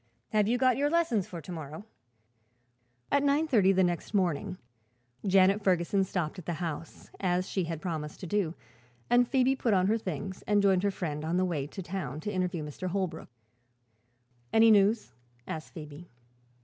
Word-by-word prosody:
Have 210 -1 +2
you 240 +2 +2
got 255 -1 +3
your 290 +1 +2
lessons 295 - +1
for 175 -5 -7
to 170 - -9
morrow?" 160 +3 -7 1.3
At 280 - +4
nine 285 +3 +2
thirty 205 -9 +4
next 185 +1 0
morning 185 0 0 0.7
Janet 195 +2 +5
Ferguson 185 +1 +2
stopped 180 -2 -3
at 175 - -12
the 175 - -1
house, 165 -1 -6
as 180 -1 0
she 190 -3 -1
had 165 0 -5
promised 155 -4 -4
to - - -5
do, 180 -2 -1 0.6
and 245 0 +5
Phoebe 265 0 +3
put 230 -5 +1
on 185 -1 +3
her 220 +4 +2
things 190 0 -5
and 210 -1 +4
joined 190 -2 +4
her 200 - +2
friend 155 -6 -4
on 165 +3 0
the 185 - +2
way 150 -6 -2
to 190 +5 -7
town, 170 -7 -4
to 210 - -4
interview 180 -3 -1
Mr. 150 +5 -5
Holbrook. 185 -4 -3 1.2
"Any 225 0 +6
news?" 205 - +3 0.3
asked 155 -1 -7
Phoebe. 155 +1 -9
185 Hz, 175 wpm, -29 LUFS, 170-210 Hz, 1.3 s, Any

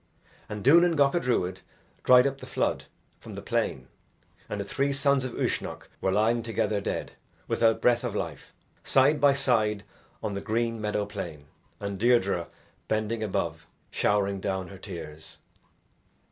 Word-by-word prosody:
And 105 -1 -5
Duanan 170 +5 +6
Gacha 145 +3 +3
Druid 95 - 0 0.4
dried 125 0 +7
up 135 0 -1
the - - -10
flood - - -1 0.3
from - - -10
the - - -6
plain 65 -1 -1 0.6
and 105 - -3
the 100 - -3
three 140 +8 0
sons 140 -1 +2
of 125 - -5
Uisnech - - -2 0.2
were 95 - +1
lying 110 +4 +2
together 110 -2 -1
dead, - - -3 0.4
without 115 -1 +2
breath 120 -1 +4
of - - -3
life, - - -5 0.3
side 145 +3 +3
by 140 -1 +6
side 110 -7 +1 0.4
on 105 -2 -2
the 100 - -3
green 115 +1 -1
meadow 105 -1 -1
plain 85 -8 -7 0.3
and 100 -1 -4
Deirdre 100 -7 +2 0.4
bending 110 +1 -1
above 85 -6 -2 0.2
showering 100 -1 +1
down 95 -2 -3
her 95 - -11
tears. 80 -5 -8
110 Hz, 150 wpm, -27 LUFS, 100-125 Hz, 0.6 s, dried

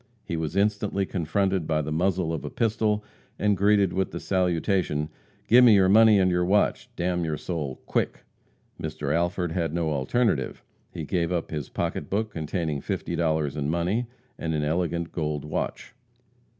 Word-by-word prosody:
He 85 - -4
was 80 +1 -3
instantly 100 -1 +1
confronted 95 0 0
by 75 -1 +1
the 75 - -4
muzzle 85 0 0
of 80 - -4
a - - -4
pistol 110 -2 0 0.3
and 105 -1 +2
greeted 100 -1 +3
with 95 0 0
the - - -6
salutation: 90 -4 0 0.4
"Give 125 +3 +7
me 115 -4 +8
your 95 -1 +5
money 110 +1 +7
and 95 -1 +3
your 90 0 +2
watch, 100 +4 +1
d - - -3
n 90 -1 0
your 80 -2 -2
soul! 75 -7 -4
quick!" - - -1 0.6
Mr. 75 -2 -2
Alford 85 +1 0
had 80 -2 -1
no 85 -2 0
alternative. 70 - 0 0.3
He 85 - -5
gave 85 +2 -1
up 85 -2 -2
his 75 -4 -4
pocketbook 110 +2 -2
containing 80 -3 -2
fifty - - -3
dollars 80 -3 0
in 75 -1 -2
money, 90 +9 0 0.3
and 80 -1 -2
an 75 - 0
elegant 85 +1 -1
gold 75 -3 -2
watch. 75 - -4
85 Hz, 170 wpm, -26 LUFS, 80-100 Hz, 0.6 s, me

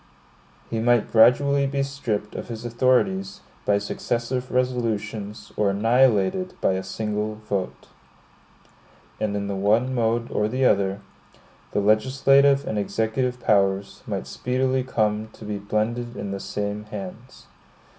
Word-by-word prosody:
He 115 - -1
might 120 0 +2
gradually 140 +5 +5
be 140 0 -1
stripped 115 -7 -3
of - - -6
his 115 0 -7
authorities 185 - +1 0.3
by 100 - +4
successive 120 +5 -2
resolutions, 115 -4 -2
or 105 -2 +2
annihilated 115 - +2
by - - +2
a 95 - -1
single 105 +2 -3
vote. 95 -2 -3 1.3
And 105 -1 -1
in 100 0 -2
the 100 - -3
one 110 +7 +2
mode 115 -1 0
or 105 - +1
the 130 +4 0
other, 100 -2 +2 0.7
the 105 - 0
legislative 135 +6 +4
and 105 - -1
executive 110 +5 -1
powers 100 -3 +1
might - - -3
speedily 130 +1 0
come 110 -3 0
to 110 - -12
be 105 -1 -3
blended 115 +4 -2
in 100 - -4
the 100 - -4
same 105 +1 -4
hands. 105 +4 -9
110 Hz, 135 wpm, -24 LUFS, 105-130 Hz, 1.3 s, gradually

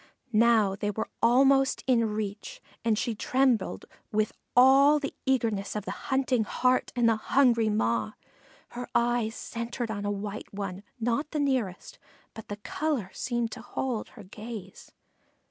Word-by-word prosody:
Now 215 -3 +4
they 205 +1 -2
were 220 +2 -3
almost 270 +3 +4
in 230 -4 +2
reach, 210 -1 -5 0.2
and 225 -2 +2
she 235 - -1
trembled 250 -1 +1 0.3
with 215 0 +1 0.3
all 270 +4 +7
the 285 -1 -4
eagerness 225 -7 0
of 210 -1 -3
the - - -3 0.2
hunting 265 -3 +2
heart 255 +4 +1
and 240 -2 +3
the 225 -1 +3
hungry 235 -2 +3
maw. 115 - 0 0.6
Her 245 0 -6
eye 240 -1 +2
centred 235 0 -5
on 205 -2 -4
a 205 - -1
white 205 +1 -5
one 195 -2 -5 0.2
not 235 +5 0
quite 295 - -42
the 300 - 0
nearest, 255 -10 -2 0.3
but 220 - -10
the 205 - -5
color 240 -2 -2
seemed 240 -2 -2
to 235 - -7
hold 245 -1 -3
her 215 - -13
gaze. 210 -1 -9
230 Hz, 155 wpm, -28 LUFS, 210-255 Hz, 0.6 s, all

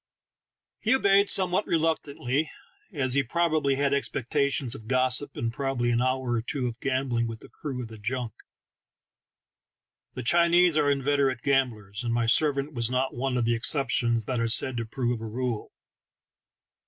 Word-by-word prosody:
He 225 +4 +2
obeyed 200 -4 +4
somewhat 185 +1 +2
reluctantly, 155 -3 -1 0.4
as 130 -7 0
he 140 - +3
probably 155 0 +1
had 140 0 +1
expectations 140 -1 -1
of 110 - -9
gossip, 130 +2 0
and 115 0 -2
probably 130 -3 -1
an 120 0 +1
hour 130 -1 0
or 120 -1 +1
two 130 +2 -3
of 120 -1 -4
gambling 130 -3 -1
with 115 -1 -7
the - - -14
crew 135 -5 -6
of - - -7
the 110 -1 -12
junk: 120 +1 -3 1.8
the 130 - -5
Chinese 170 +4 +4
are 150 -2 +3
inveterate 140 -2 +1
gam 135 -2 +3
blers, 100 -1 -9
and 120 -1 -1
my 120 -1 +1
servant 140 +4 +2
was 120 -2 0
not 130 +1 -1
one 125 +1 -2
of 120 - +1
the 120 - +2
excep 125 +2 +1
tions 115 -3 +1
that 125 0 -2
are 115 - +1
said 125 +3 +2
to 115 -1 -3
prove 120 -1 -2
a - - -5
rule. 120 0 -3
130 Hz, 170 wpm, -27 LUFS, 120-145 Hz, 1.8 s, obeyed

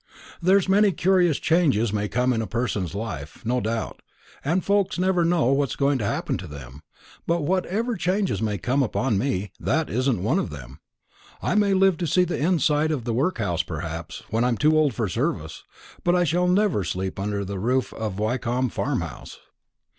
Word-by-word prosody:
There's 190 +2 +4
many 200 +1 +4
curious 180 -4 +2
changes 135 - +2
may 105 0 0
come 125 +3 +1
in 115 - 0
a 110 - -4
person's 105 -7 -2
life, 90 -10 -6
no 125 +2 +1
doubt, 115 +1 -3 0.4
and 165 +6 0
folks 200 0 +1
never 180 -1 +2
know 165 -6 +2
what's 140 -1 0
going 140 -1 +1
to 105 - -2
happen - - -1
to 90 - -7
them; 70 -2 -10 0.5
but 170 -1 +1
whatever 190 +8 0
changes 190 - 0
may 105 -2 -1
come 125 +9 0
upon 125 -3 0
me, 105 -6 -2
that - - 0
isn't 125 -3 0
one 110 - +2
of - - -2
them. 70 -1 -10 0.6
I - - -1
may 205 -2 +3
live 190 -2 +4
to 170 - -2
see 180 +5 +3
the 175 -1 -2
inside 155 -1 +2
of 140 -6 -2
the 115 - -2
workhouse, 115 - 0
perhaps, - - -6
when 115 +2 +1
I'm 125 -2 +1
too 155 +1 +3
old 150 -6 +3
for 115 -4 -1
service; 90 - -2 0.4
but 175 0 +3
I 180 - +3
shall 175 +2 +1
never 185 - +2
sleep 95 +2 -3
under 100 0 -2
the 100 0 -5
roof 125 +5 0
of 110 -4 -4
Wyncomb 120 +3 0
Farmhouse." - - -4
130 Hz, 185 wpm, -24 LUFS, 105-175 Hz, 0.6 s, There's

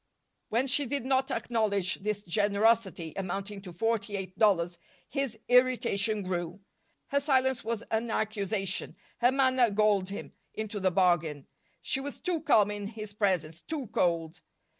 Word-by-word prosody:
When 235 +4 +1
she 275 +1 +1
did 280 0 -2
not 265 0 +2
acknowledge 200 -6 0
this 210 0 -2
generosity, 205 -2 +1
amounting 195 +2 -4
to 190 -2 -9
forty 205 +2 -1
eight 185 -1 -6
dollars, 175 -5 +3 0.3
his 275 -6 -2
irritation 235 -4 +3
grew. 175 0 -3 0.5
Her 280 - +2
silence 265 -3 +2
was 230 -1 -2
an 225 +1 0
accusation. 200 -3 -2 0.2
Her 245 +1 +4
manner 260 -3 +3
galled 205 -2 +2
him, 200 - -6 0.2
into 215 -1 -4
the 190 -1 +2
bargain. 170 -6 +1 0.4
She - - 0
was 280 +1 -6
too 345 -3 -1
calm 210 -9 +4
in 205 -1 -4
his 215 -1 -8
presence, 180 -6 0
too 305 -4 -4
cold. 165 -2 0
210 Hz, 145 wpm, -29 LUFS, 190-240 Hz, 0.5 s, Her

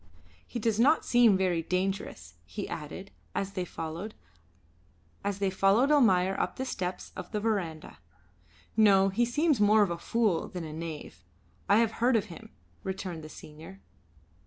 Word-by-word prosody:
"He - - -5
does 225 -1 0
not 285 +7 +4
seem 235 -5 +5
very 180 -3 +1
dangerous," 180 - -3
he 80 0 -6
added, 165 +6 -7 0.2
as 195 0 -2
they 185 -2 -3
followed 165 +6 -6 1.1
Almayer 195 +1 +3
up - - -1
the 260 - -3
steps 180 -7 -4
of 180 - -8
the 210 - -1
verandah. 170 - -3 0.8
"No, 195 -3 +5
he 230 +5 +1
seems 290 0 +1
more 210 +1 +6
of 195 - -1
a 170 - -4
fool 215 -4 0
than 180 -4 -6
a 155 -1 -7
knave; 155 - -7 0.5
I 200 - +6
have 225 -1 +3
heard 245 +1 +4
of 215 -2 +2
him," 160 - -12 0.3
returned 190 -4 -5
the 155 - -9
senior. 150 -11 -12
195 Hz, 150 wpm, -29 LUFS, 170-220 Hz, 1.1 s, more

